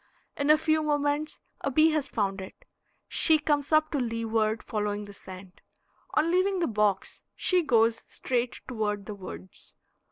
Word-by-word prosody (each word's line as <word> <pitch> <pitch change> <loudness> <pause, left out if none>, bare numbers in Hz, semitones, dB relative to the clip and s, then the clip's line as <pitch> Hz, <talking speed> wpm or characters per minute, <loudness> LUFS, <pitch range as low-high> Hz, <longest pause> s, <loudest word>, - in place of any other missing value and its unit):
In 285 0 -1
a 305 - +7
few 315 0 +1
moments 295 0 -1 0.2
a - - -2
bee 310 +4 +4
has 300 -2 -1
found 195 -2 -1
it; 190 - -12 0.4
she 320 -2 +5
comes 295 -1 -1
up 310 0 +3
to 290 - 0
leeward, 225 -2 -1
following 210 -1 -3
the 205 - -11
scent. 185 -1 -12 0.5
On 320 +2 +2
leaving 375 +2 +2
the 350 - +1
box 210 - 0
she 365 -1 +2
goes 230 -6 +2
straight 245 -1 -2
toward 210 -4 -2
the 210 - -6
woods. 190 -1 -11
245 Hz, 160 wpm, -27 LUFS, 210-310 Hz, 0.5 s, a